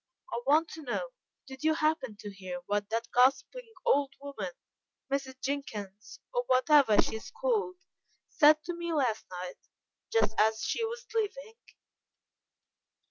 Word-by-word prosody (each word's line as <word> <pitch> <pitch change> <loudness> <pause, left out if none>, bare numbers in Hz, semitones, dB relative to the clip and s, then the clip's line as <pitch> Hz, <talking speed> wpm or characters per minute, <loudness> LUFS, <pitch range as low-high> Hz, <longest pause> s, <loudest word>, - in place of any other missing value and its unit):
I 235 - -2
want 310 +3 +5
to 320 - -8
know 305 - -3 0.4
did 265 +1 -10
you 315 0 +3
happen 305 -8 0
to 205 -1 -7
hear 185 -2 -6
what 205 +1 -1
that 230 +1 -2
gossiping 360 - +2
old 280 - +2
woman, 280 - -6 0.6
Mrs. 265 -2 -2
Jenkins, 215 -8 -5
or - - +2
what 255 +4 +2
ever 275 -8 +6
she 220 - +2
is 220 - -10
called, 450 -7 0 0.5
said 305 -1 +5
to 350 - -4
me 340 0 -4
last 250 -8 0
night, 180 0 -7 0.5
just 455 - +3
as 220 +1 +4
she 465 - -1
was 470 +2 -4
leaving?" 455 +1 -3
280 Hz, 145 wpm, -30 LUFS, 220-345 Hz, 0.6 s, ever